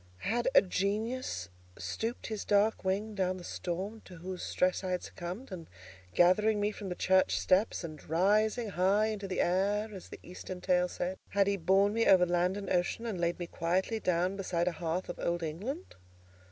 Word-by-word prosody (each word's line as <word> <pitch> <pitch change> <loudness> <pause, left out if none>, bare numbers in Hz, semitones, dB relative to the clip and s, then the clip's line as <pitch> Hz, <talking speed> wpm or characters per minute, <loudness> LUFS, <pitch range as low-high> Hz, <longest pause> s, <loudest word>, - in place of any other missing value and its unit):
Had 235 +3 0
a - - +8
Genius 200 - -2 0.3
stooped 230 +2 -4
his 215 -2 -4
dark 210 +2 +2
wing 200 +3 -1
down 185 -2 0
the 180 - -9
storm 190 +6 -4
to 180 - -11
whose 180 +2 -6
stress 185 +1 0
I 185 - -2
had 180 -1 -1
succumbed, 185 +8 -7
and 170 -3 -7 0.5
gathering 210 +5 +4
me 205 +1 +1
from 205 -2 -7
the 180 - -3
church 185 +1 +3
steps, 190 +1 +2
and 155 -3 -7
"rising 210 +7 +2
high 200 +4 +2
into 205 -2 -4
the 190 - 0
air," 205 +4 +1
as 190 - -9
the - - -8
eastern 180 +1 -8
tale 180 0 +2
said, 180 +1 -3
had 200 0 +3
he 200 0 +1
borne 195 +3 +3
me 230 +1 +2
over 185 -2 +7
land 180 +2 +1
and 200 -2 -5
ocean, 180 +6 0
and 205 -7 -3
laid 170 0 +1
me 175 - -4
quietly 185 +6 -1
down 180 0 +1
beside 180 -3 -1
a - - +3
hearth 170 +1 -3
of 175 - -6
Old 170 0 -1
England? 210 - -5
190 Hz, 195 wpm, -31 LUFS, 180-210 Hz, 0.5 s, a